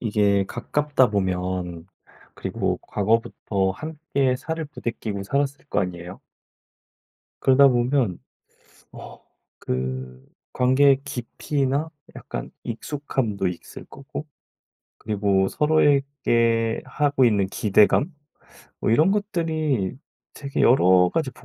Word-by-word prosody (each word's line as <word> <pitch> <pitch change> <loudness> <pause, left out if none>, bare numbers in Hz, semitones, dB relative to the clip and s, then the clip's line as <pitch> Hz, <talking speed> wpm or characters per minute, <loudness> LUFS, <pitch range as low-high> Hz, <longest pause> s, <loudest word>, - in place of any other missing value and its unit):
이게 100 -3 +2
가깝다 140 0 +1
보면 90 -3 -2 0.5
그리고 - - -2
과거부터 100 -2 0
함께 140 - -2
살을 160 +3 -4
부대끼고 115 -7 -5
살았을 140 +5 -1
거 105 - 0
아니에요? 90 -1 -5 1.2
그러다보면 130 -5 +3 0.8
어 - - -11 0.4
그 65 0 -4 0.3
관계의 135 +2 +4
깊이나 140 +3 -2 0.2
약간 - - -6
익숙함도 115 -5 -3
있을 85 - -9
거고 140 +2 -8 0.7
그리고 100 -2 +1
서로에게 135 -7 +2
하고 145 -3 +2
있는 100 -5 +2
기대감 105 - +3 0.7
뭐 - - 0
이런 155 +11 +4
것들이 160 - -1 0.3
되게 140 -1 -5
여러 90 -7 +5
가지 155 -5 -1
120 Hz, 220 characters per minute, -23 LUFS, 100-145 Hz, 1.2 s, 여러